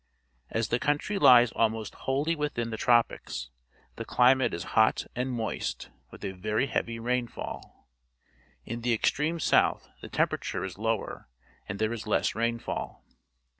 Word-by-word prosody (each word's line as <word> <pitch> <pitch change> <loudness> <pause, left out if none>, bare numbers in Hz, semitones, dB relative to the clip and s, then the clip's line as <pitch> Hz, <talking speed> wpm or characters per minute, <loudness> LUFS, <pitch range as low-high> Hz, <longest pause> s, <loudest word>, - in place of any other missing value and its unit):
As 115 -1 -1
the 120 - +1
country 150 +9 0
lies 120 - +7
almost 110 -2 0
wholly 145 +5 -1
within 145 -6 -2
the - - -2
tropics, 120 - +1 0.5
the - - -4
climate 130 +1 +4
is 85 - -4
hot 110 -1 +3
and 125 +2 -1
moist, 115 -2 -3 0.2
with - - -10
a 95 - -2
very 105 +6 -1
heavy 115 -2 -2
rainfall. 120 - -4 0.8
In 115 +1 -5
the 120 0 +1
extreme 150 +8 0
south - - +2
the - - -8
temperature - - -1
is 95 0 -6
lower, 110 - -2 0.4
and - - -3
there 110 +2 0
is 110 -1 -6
less 105 - +1
rainfall. 115 +1 -3
115 Hz, 145 wpm, -28 LUFS, 110-130 Hz, 0.8 s, lies